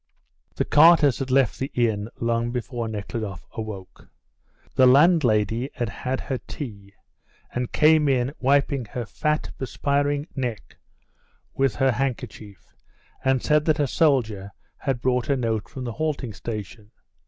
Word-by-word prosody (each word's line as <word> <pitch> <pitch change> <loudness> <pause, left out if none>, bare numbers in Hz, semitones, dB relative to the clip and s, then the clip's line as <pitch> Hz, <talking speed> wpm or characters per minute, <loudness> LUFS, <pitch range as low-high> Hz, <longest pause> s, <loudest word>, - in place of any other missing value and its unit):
The - - 0
carters 155 -4 +6
had 135 -1 -3
left 130 -3 +2
the 135 - -2
inn 110 -3 0
long 115 0 0
before 120 -1 -4
Nekhludoff 105 -2 -5
awoke. 105 -4 -8 0.6
The 130 - +5
landlady 125 - +4
had 120 -5 -2
had 130 +3 -3
her 130 -2 -3
tea, 100 -8 -9 0.6
and 125 0 -3
came 155 -1 +4
in 130 0 +1
wiping 140 -1 +2
her 120 +3 -5
fat, 150 +6 -2
perspiring 145 +2 0
neck 125 -6 -4 0.8
with 135 -5 +1
her 135 -1 +3
handkerchief, 115 -5 -5 0.5
and 130 -1 +2
said 150 0 +3
that 155 -1 +2
a 145 - +3
soldier 120 - +1 0.3
had 130 -3 -2
brought 125 0 0
a 140 - +2
note 115 -4 -2
from 130 - -7
the 120 - -4
halting 140 -4 -3
station. 105 0 -7
125 Hz, 140 wpm, -24 LUFS, 110-140 Hz, 0.8 s, carters